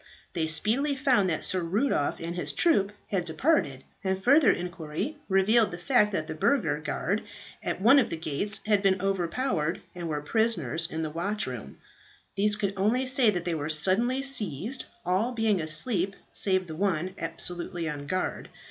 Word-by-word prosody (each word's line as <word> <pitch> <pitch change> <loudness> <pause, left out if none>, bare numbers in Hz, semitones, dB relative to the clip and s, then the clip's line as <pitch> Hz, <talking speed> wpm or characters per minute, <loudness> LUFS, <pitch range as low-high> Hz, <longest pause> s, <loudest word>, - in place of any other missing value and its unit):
They 160 -3 -1
speedily 230 - +2
found 255 -9 +2
that 160 - 0
Sir 185 - +3
Rudolph 180 - 0
and 170 +1 -5
his 180 - -3
troop 205 - +3 0.2
had 190 -3 0
departed; 160 - 0 0.2
and 190 0 -2
further 280 0 +6
inquiry 175 - -4
revealed 210 +4 +3
the 175 - -7
fact 210 +1 +2
that 170 -5 -2
the 160 - -5
burgher 155 - +1
guard 190 +6 -2 0.4
at - - -3
one 240 +8 +6
of 255 - +1
the 165 - -4
gates 165 +7 0
had 210 -2 +3
been 190 -1 +2
overpowered 185 - -1
and 175 -2 -6
were 150 -1 -3
prisoners 165 - 0
in 160 +1 -4
the 155 - -4
watchroom. 165 - -4 0.6
These 210 +1 +3
could 200 -2 -2
only 225 +7 +1
say 255 -2 +3
that 180 -4 -2
they 175 - -1
were 155 -1 -3
suddenly 205 - +2
seized, 230 - 0 0.2
all 195 +8 0
being 220 -5 +1
asleep 180 +5 +1 0.2
save 185 -2 +1
the 160 -2 -8
one 185 -1 -1
absolutely 170 +1 -3
on 145 -2 -5
guard. 185 +2 -3
190 Hz, 170 wpm, -27 LUFS, 165-220 Hz, 0.6 s, further